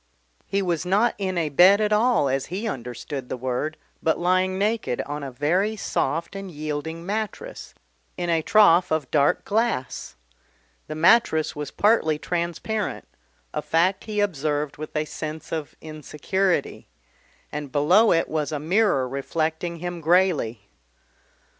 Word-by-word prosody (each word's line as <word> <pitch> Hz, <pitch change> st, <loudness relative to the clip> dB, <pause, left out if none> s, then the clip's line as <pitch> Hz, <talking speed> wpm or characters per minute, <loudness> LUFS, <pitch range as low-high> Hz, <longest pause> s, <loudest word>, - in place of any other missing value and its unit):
He 200 Hz, 0 st, 0 dB
was 170 Hz, -4 st, -1 dB
not 205 Hz, +6 st, +2 dB
in 190 Hz, -2 st, -2 dB
a 160 Hz, -3 st, 0 dB
bed 180 Hz, +8 st, +6 dB
at 210 Hz, 0 st, +1 dB
all 225 Hz, -, +3 dB
as 135 Hz, 0 st, -1 dB
he 200 Hz, +6 st, -4 dB
understood 125 Hz, -, -5 dB
the -, -, -3 dB
word, 130 Hz, +5 st, -2 dB, 0.2 s
but 160 Hz, -, +1 dB
lying 185 Hz, +1 st, +1 dB
naked 210 Hz, -, 0 dB
on 145 Hz, +1 st, -5 dB
a 140 Hz, -, -5 dB
very 175 Hz, -, 0 dB
soft 165 Hz, -3 st, -2 dB
and 195 Hz, -1 st, -6 dB
yielding 155 Hz, +1 st, -5 dB
mattress, 210 Hz, +1 st, -5 dB, 0.4 s
in 175 Hz, -, -2 dB
a 165 Hz, -1 st, +2 dB
trough 185 Hz, -2 st, +5 dB
of 155 Hz, -4 st, -1 dB
dark 145 Hz, -2 st, +2 dB
glass. 220 Hz, -, -1 dB, 0.7 s
The 155 Hz, -, -5 dB
mattress 160 Hz, -1 st, +3 dB
was 150 Hz, -1 st, -5 dB
partly 205 Hz, -8 st, +2 dB
transparent, 175 Hz, +6 st, -3 dB, 0.5 s
a -, -, -2 dB
fact 180 Hz, +4 st, +1 dB
he 210 Hz, -1 st, -1 dB
observed 150 Hz, -5 st, -1 dB
with 155 Hz, +1 st, -8 dB
a 155 Hz, 0 st, 0 dB
sense 155 Hz, 0 st, -7 dB
of 155 Hz, -3 st, -4 dB
insecurity, 160 Hz, +5 st, -2 dB, 0.6 s
and 150 Hz, -2 st, -5 dB
below 175 Hz, -, +4 dB
it 165 Hz, -, +2 dB
was 155 Hz, -1 st, -2 dB
a 150 Hz, -, -1 dB
mirror 165 Hz, -3 st, +2 dB
reflecting 160 Hz, +5 st, -2 dB
him 175 Hz, 0 st, -5 dB
greyly. 165 Hz, -, +2 dB
165 Hz, 145 wpm, -24 LUFS, 150-195 Hz, 0.7 s, bed